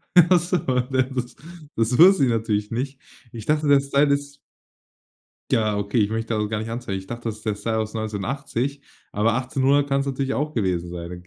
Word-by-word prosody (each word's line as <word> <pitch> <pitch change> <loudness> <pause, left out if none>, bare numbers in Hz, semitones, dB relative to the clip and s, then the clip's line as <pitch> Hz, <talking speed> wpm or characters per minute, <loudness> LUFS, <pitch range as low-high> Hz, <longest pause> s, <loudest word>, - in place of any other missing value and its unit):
Ach 175 0 +7
so. 175 +2 0
Da 130 -2 0
das 125 -1 -5 0.4
das 115 +2 +1
wusste 180 -2 +7
ich - - +1
natürlich 110 -2 -1
nicht. 135 +3 -3 0.3
Ich 115 -2 -8
dachte, 150 0 +1
der 140 -1 +6
Style 140 +1 +2
ist 140 0 -4 1.1
Ja, 110 -2 +2
okay, 100 +3 0
ich 105 -1 +2
möchte 115 +1 -2
das 105 -1 0
auch 105 - -3
gar 105 -1 -2
nicht 110 +1 -5
anzweifeln. 115 -5 -4
Ich 95 - -13
dachte, 120 -1 -4
das 110 - -6
ist 110 - -18
der 105 -2 0
Style 110 +2 -2
aus 110 0 -3
1980 120 +5 -3 0.3
aber 105 +2 +2
1800 135 +2 +1
kann's 140 0 0
natürlich 135 0 -2
auch 150 +2 -2
gewesen 90 -6 -1
sein. 90 +1 -7
120 Hz, 200 wpm, -23 LUFS, 110-140 Hz, 1.1 s, Ach